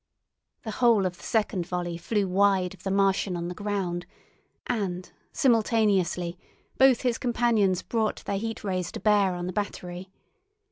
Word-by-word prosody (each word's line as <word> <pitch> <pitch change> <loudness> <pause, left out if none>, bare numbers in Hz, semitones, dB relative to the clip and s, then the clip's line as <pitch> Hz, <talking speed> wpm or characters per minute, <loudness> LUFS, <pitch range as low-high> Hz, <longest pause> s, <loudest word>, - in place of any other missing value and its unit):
The 220 - -4
whole 230 -4 +3
of 180 -1 -3
the - - -17
second 195 -6 0
volley 175 -1 -3
flew 200 +3 -1
wide 190 -1 +2
of 190 - -16
the 195 - -3
Martian 195 -1 +1
on 170 0 -4
the - - -4
ground, 185 -3 -3 0.6
and, 190 -6 -2 0.2
simultaneously, 210 - +1 0.4
both 265 -2 +6
his 245 -3 0
companions 230 -6 +1
brought 220 -2 -2
their 195 - -1
Heat 225 +1 -5
Rays 185 -3 -2
to - - -5
bear 200 -2 +3
on 175 0 -4
the 180 - -4
battery. 185 -2 -5
195 Hz, 155 wpm, -27 LUFS, 180-220 Hz, 0.6 s, both